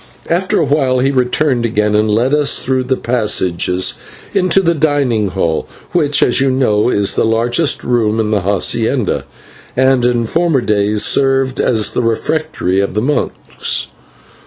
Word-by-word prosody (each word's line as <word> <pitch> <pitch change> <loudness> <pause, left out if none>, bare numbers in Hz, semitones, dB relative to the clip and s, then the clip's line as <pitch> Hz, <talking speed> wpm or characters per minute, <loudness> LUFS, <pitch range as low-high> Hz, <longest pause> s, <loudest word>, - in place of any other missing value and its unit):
After 180 +3 +1
a - - +2
while 135 -3 +1
he 135 +2 +1
returned 130 0 0
again 105 -2 0
and 105 +1 +2
led 120 +6 +1
us 150 -1 +1
through 130 0 0
the 130 0 0
passages 95 -6 0 0.4
into 185 +1 +2
the 170 -3 +1
dining 140 -9 0
hall, 90 -4 -2 0.2
which, 150 -4 +2
as 125 - +2
you 135 - +2
know, 125 -4 +1
is 100 -4 +1
the - - 0
largest 120 +7 0
room 115 -3 0
in 110 -1 -1
the 105 -2 +1
/hacienda/, 110 +5 0 0.5
and 130 -1 +3
in 120 -1 +1
former 165 +1 +1
days 105 -1 +1
served 135 -1 +1
as 110 -4 +1
the - - -1
refectory 115 - -1
of 100 0 -2
the 105 - +1
monks. 145 +3 -3
125 Hz, 160 wpm, -15 LUFS, 105-140 Hz, 0.5 s, and